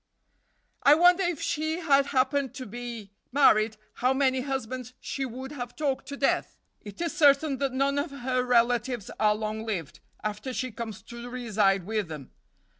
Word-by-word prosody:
"I 285 Hz, -, +7 dB
wonder, 355 Hz, +3 st, +5 dB
if 350 Hz, -4 st, 0 dB
she 315 Hz, +2 st, -1 dB
had 280 Hz, -5 st, +3 dB
happened 270 Hz, 0 st, +1 dB
to 260 Hz, -2 st, -6 dB
be 235 Hz, -2 st, -7 dB, 0.2 s
married, 220 Hz, -5 st, +4 dB, 0.2 s
how 255 Hz, +2 st, +1 dB
many 265 Hz, -1 st, +2 dB
husbands 255 Hz, -2 st, -4 dB
she 275 Hz, -, -3 dB
would 260 Hz, +2 st, -7 dB
have 245 Hz, -4 st, -6 dB
talked 280 Hz, -3 st, -2 dB
to 280 Hz, -, -6 dB
death. 275 Hz, -, 0 dB, 0.2 s
It 205 Hz, -3 st, -11 dB
is 340 Hz, -2 st, -2 dB
certain 285 Hz, -2 st, +4 dB
that 275 Hz, 0 st, -1 dB
none 275 Hz, +2 st, +1 dB
of 295 Hz, +4 st, -2 dB
her 255 Hz, -2 st, -1 dB
relatives 245 Hz, -2 st, +1 dB
are 210 Hz, -1 st, +4 dB
long 215 Hz, 0 st, -3 dB
lived, 190 Hz, -9 st, -4 dB, 0.2 s
after 215 Hz, +5 st, -3 dB
she 255 Hz, 0 st, -3 dB
comes 215 Hz, -3 st, -7 dB
to 235 Hz, +1 st, -9 dB
reside 210 Hz, -6 st, +1 dB
with 215 Hz, -2 st, -1 dB
them. 150 Hz, -5 st, -8 dB
255 Hz, 170 wpm, -27 LUFS, 220-280 Hz, 0.2 s, I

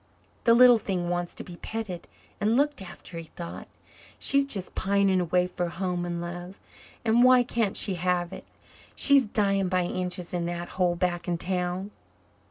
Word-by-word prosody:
"The 230 Hz, -, +6 dB
little 245 Hz, -1 st, +7 dB
thing 180 Hz, -4 st, -2 dB
wants 175 Hz, -1 st, -3 dB
to -, -, -5 dB
be 175 Hz, -2 st, -11 dB
petted 210 Hz, -6 st, -6 dB, 0.3 s
and 220 Hz, +3 st, +2 dB
looked 290 Hz, -3 st, +1 dB
after," 175 Hz, -2 st, -9 dB
he 165 Hz, -, -8 dB
thought. 170 Hz, -1 st, -7 dB, 0.5 s
"She's 280 Hz, 0 st, +2 dB
just 195 Hz, -8 st, -2 dB
pining 195 Hz, -1 st, +2 dB
away 180 Hz, +1 st, +1 dB
for 180 Hz, -1 st, -3 dB
home 175 Hz, 0 st, -3 dB
and 175 Hz, -1 st, -3 dB
love. 175 Hz, +2 st, -7 dB, 0.5 s
And 230 Hz, +2 st, +4 dB
why 255 Hz, 0 st, +6 dB
can't 230 Hz, -4 st, 0 dB
she 195 Hz, -, +3 dB
have 180 Hz, 0 st, -1 dB
it? -, -, -9 dB, 0.5 s
She's 280 Hz, -4 st, +5 dB
dying 195 Hz, -3 st, +1 dB
by 185 Hz, -1 st, +1 dB
inches 180 Hz, 0 st, -3 dB
in 175 Hz, -1 st, -1 dB
that 175 Hz, 0 st, -5 dB
hole 180 Hz, -2 st, 0 dB
back 175 Hz, -1 st, -2 dB
in 175 Hz, -1 st, 0 dB
town." 180 Hz, +2 st, -2 dB
180 Hz, 175 wpm, -27 LUFS, 175-210 Hz, 0.5 s, little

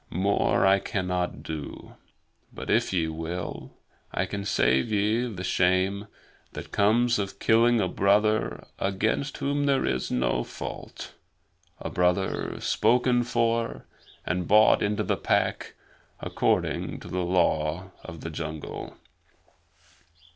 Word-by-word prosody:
More 95 Hz, +2 st, +1 dB
I 95 Hz, +1 st, +5 dB
cannot 90 Hz, -2 st, -2 dB
do; 75 Hz, -3 st, -7 dB, 0.6 s
but -, -, -5 dB
if -, -, +2 dB
ye 85 Hz, -4 st, +1 dB
will, 80 Hz, +2 st, -5 dB, 0.4 s
I 95 Hz, -, 0 dB
can 100 Hz, +1 st, -5 dB
save 65 Hz, -, +2 dB
ye 110 Hz, +4 st, +1 dB
the 90 Hz, -3 st, -6 dB
shame 95 Hz, +3 st, +1 dB, 0.5 s
that -, -, -8 dB
comes 115 Hz, +3 st, +3 dB
of 100 Hz, -1 st, -4 dB
killing 115 Hz, +1 st, +4 dB
a 100 Hz, -, +1 dB
brother 100 Hz, -, +1 dB
against 110 Hz, +8 st, -1 dB
whom 145 Hz, +1 st, 0 dB
there 135 Hz, -1 st, +2 dB
is 65 Hz, -, -1 dB
no -, -, 0 dB
fault -, -, -8 dB, 0.7 s
a -, -, -5 dB
brother 90 Hz, +2 st, 0 dB
spoken 125 Hz, 0 st, +2 dB
for 115 Hz, -1 st, -1 dB, 0.4 s
and 90 Hz, 0 st, -1 dB
bought 105 Hz, +1 st, +6 dB
into 105 Hz, 0 st, 0 dB
the -, -, 0 dB
Pack -, -, 0 dB, 0.4 s
according -, -, -1 dB
to -, -, -10 dB
the 90 Hz, -, -3 dB
Law 85 Hz, 0 st, 0 dB
of 80 Hz, -1 st, -9 dB
the 85 Hz, -, -5 dB
Jungle." 80 Hz, -1 st, -6 dB
95 Hz, 125 wpm, -26 LUFS, 90-110 Hz, 0.7 s, bought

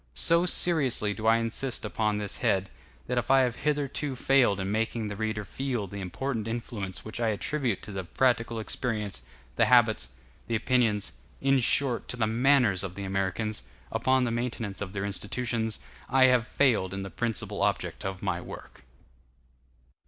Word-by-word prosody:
So 170 Hz, -, +5 dB
seriously 135 Hz, -13 st, +3 dB
do 110 Hz, +1 st, -3 dB
I 115 Hz, +1 st, +6 dB
insist 115 Hz, +2 st, -2 dB
upon 105 Hz, 0 st, 0 dB
this 105 Hz, -1 st, -1 dB
head, 95 Hz, 0 st, 0 dB, 0.3 s
that 125 Hz, 0 st, 0 dB
if 120 Hz, -, -5 dB
I 135 Hz, 0 st, +6 dB
have 125 Hz, -2 st, 0 dB
hitherto 145 Hz, -1 st, -1 dB
failed 125 Hz, -6 st, +3 dB
in 95 Hz, +1 st, -2 dB
making 110 Hz, +1 st, -1 dB
the 105 Hz, -, -5 dB
reader 110 Hz, 0 st, -2 dB
feel 125 Hz, 0 st, -3 dB
the 100 Hz, +1 st, -7 dB
important 115 Hz, +4 st, -3 dB
influence 115 Hz, -4 st, -4 dB
which 110 Hz, +1 st, -6 dB
I 115 Hz, -, +1 dB
attribute 115 Hz, +1 st, -1 dB
to 105 Hz, -, -7 dB
the 95 Hz, -1 st, -4 dB
practical 115 Hz, +4 st, +1 dB
experience, 105 Hz, -, -3 dB, 0.4 s
the -, -, +5 dB
habits, -, -, +4 dB, 0.4 s
the 115 Hz, -, -1 dB
opinions, 110 Hz, -3 st, +1 dB, 0.3 s
in 135 Hz, 0 st, +3 dB
short, 125 Hz, 0 st, +1 dB
to 125 Hz, -, -3 dB
the 115 Hz, -, +2 dB
manners 115 Hz, -4 st, +3 dB
of 95 Hz, -2 st, -5 dB
the 100 Hz, -, -5 dB
Americans, 95 Hz, +3 st, -2 dB, 0.3 s
upon 130 Hz, +3 st, +2 dB
the 120 Hz, -, 0 dB
maintenance 115 Hz, -4 st, -3 dB
of 100 Hz, -1 st, -5 dB
their 100 Hz, 0 st, -2 dB
institutions, 110 Hz, +3 st, -2 dB, 0.3 s
I 130 Hz, 0 st, +5 dB
have 125 Hz, -2 st, +4 dB
failed 110 Hz, -11 st, +2 dB
in 95 Hz, -, -4 dB
the 95 Hz, -, -7 dB
principal 115 Hz, -3 st, -2 dB
object -, -, -1 dB
of 95 Hz, -1 st, -5 dB
my -, -, -1 dB
work. -, -, -11 dB
115 Hz, 170 wpm, -28 LUFS, 100-125 Hz, 0.4 s, I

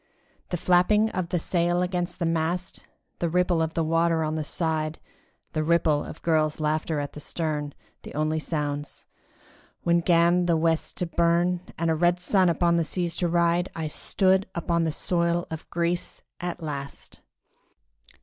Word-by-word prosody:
The 175 Hz, -, -1 dB
flapping 195 Hz, +6 st, +3 dB
of 180 Hz, -2 st, -3 dB
the 180 Hz, -, 0 dB
sail 175 Hz, +1 st, +1 dB
against 180 Hz, -1 st, -2 dB
the 170 Hz, -, -1 dB
mast, 165 Hz, +2 st, -2 dB, 0.3 s
The 170 Hz, -, 0 dB
ripple 180 Hz, 0 st, +2 dB
of 160 Hz, 0 st, -2 dB
the 165 Hz, -, +1 dB
water 165 Hz, 0 st, +2 dB
on 155 Hz, 0 st, -1 dB
the 155 Hz, -1 st, -2 dB
side, 155 Hz, 0 st, -2 dB, 0.6 s
The 155 Hz, -, 0 dB
ripple 155 Hz, -2 st, +2 dB
of -, -, -10 dB
girls' 155 Hz, -2 st, +1 dB
laughter 155 Hz, 0 st, 0 dB
at 145 Hz, 0 st, -4 dB
the -, -, -8 dB
stern, 150 Hz, -2 st, -3 dB, 0.3 s
The -, -, -10 dB
only 155 Hz, +1 st, 0 dB
sounds:—when 150 Hz, +3 st, -4 dB
'gan 170 Hz, +1 st, +3 dB
the 170 Hz, -2 st, +3 dB
West 160 Hz, 0 st, 0 dB
to 180 Hz, -, -1 dB
burn, 170 Hz, +1 st, +2 dB, 0.2 s
And 165 Hz, 0 st, +1 dB
a -, -, +2 dB
red 175 Hz, +2 st, +2 dB
sun 185 Hz, 0 st, +3 dB
upon 170 Hz, 0 st, +2 dB
the 165 Hz, -, +2 dB
seas 170 Hz, +1 st, -2 dB
to 175 Hz, -, +1 dB
ride, 170 Hz, +1 st, +2 dB
I 160 Hz, -, -3 dB
stood 190 Hz, +5 st, +1 dB
upon 170 Hz, 0 st, 0 dB
the 160 Hz, -, 0 dB
soil 170 Hz, +1 st, 0 dB
of 160 Hz, 0 st, -7 dB
Greece 170 Hz, 0 st, -2 dB, 0.2 s
at 175 Hz, -1 st, -4 dB
last! 140 Hz, -2 st, -7 dB
170 Hz, 165 wpm, -26 LUFS, 160-175 Hz, 0.6 s, flapping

